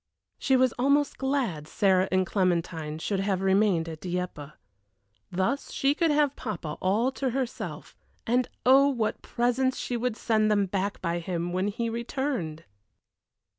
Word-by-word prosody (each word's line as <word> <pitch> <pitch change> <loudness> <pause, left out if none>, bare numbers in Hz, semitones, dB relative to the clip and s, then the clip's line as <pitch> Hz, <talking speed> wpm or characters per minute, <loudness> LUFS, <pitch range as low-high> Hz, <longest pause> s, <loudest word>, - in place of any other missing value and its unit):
She 265 - +2
was 255 -1 +3
almost 280 +2 +2
glad 255 - -1
Sarah 190 0 +2
and 185 0 +2
Clementine 170 -5 -1
should 195 +4 -2
have 195 -1 0
remained 190 -3 +2
at 160 -1 -7
Dieppe. 175 -5 -4 0.8
Thus 190 +10 -1
she 275 +1 +2
could 330 +2 +1
have 295 -2 +2
papa 170 -9 -5
all 215 +8 +2
to 265 0 -2
herself, 255 0 -4 0.3
and 245 +1 +1 0.2
oh, 270 +2 +7
what 235 -6 -1
presents 245 +2 0
she 245 - -3
would 240 -1 -1
send 215 -2 +2
them 205 -2 +3
back 195 +1 -3
by 170 -1 0
him 175 0 -3
when 185 +2 0
he 230 +3 -2
returned! 235 - -3
210 Hz, 150 wpm, -27 LUFS, 180-255 Hz, 0.8 s, oh